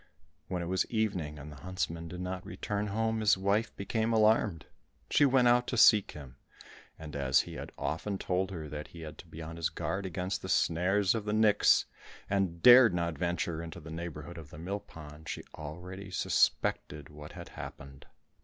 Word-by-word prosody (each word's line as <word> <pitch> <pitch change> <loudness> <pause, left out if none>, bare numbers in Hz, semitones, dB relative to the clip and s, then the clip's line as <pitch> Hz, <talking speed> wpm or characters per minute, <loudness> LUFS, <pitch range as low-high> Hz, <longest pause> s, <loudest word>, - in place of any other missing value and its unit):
When 90 -2 -3
it - - -4
was 95 +2 0
evening, 95 -10 -1
and 75 +1 -9
the 75 - -11
huntsman 85 0 -4
did 90 +2 -7
not 90 0 -4
return 100 +3 -3
home, 110 +2 0
his 105 -2 +4
wife 100 +4 0
became 110 +3 -1
alarmed. 110 -6 +3 0.5
She 145 - +5
went 130 -2 +4
out 120 0 +4
to 125 - -2
seek 105 -3 +6
him, 65 -4 -11 0.6
and 75 -2 -9
as 70 -2 +3
he - - -9
had - - -7
often 85 +8 -2
told 95 +1 -1
her 80 -5 -6
that 75 0 -6
he 85 - -12
had 75 -1 -9
to - - -11
be 80 - -9
on 80 +1 -7
his 85 - 0
guard 95 0 -3
against 90 +2 -3
the - - -7
snares 90 +4 +2
of 110 -3 -3
the 105 - -1
nix, 110 -1 +4 0.5
and 95 -4 0
dared 120 -6 +9
not 85 -2 -1
venture 85 0 -2
into 85 -1 -8
the 80 +1 -10
neighbourhood 85 0 -6
of 75 -3 -11
the - - -11
mill 95 +6 -3
pond, 75 -3 -12
she - - -5
already 90 +6 -8
suspected 75 -4 0
what 75 0 -11
had - - -9
happened. 70 -1 -10
90 Hz, 190 wpm, -31 LUFS, 80-105 Hz, 0.6 s, dared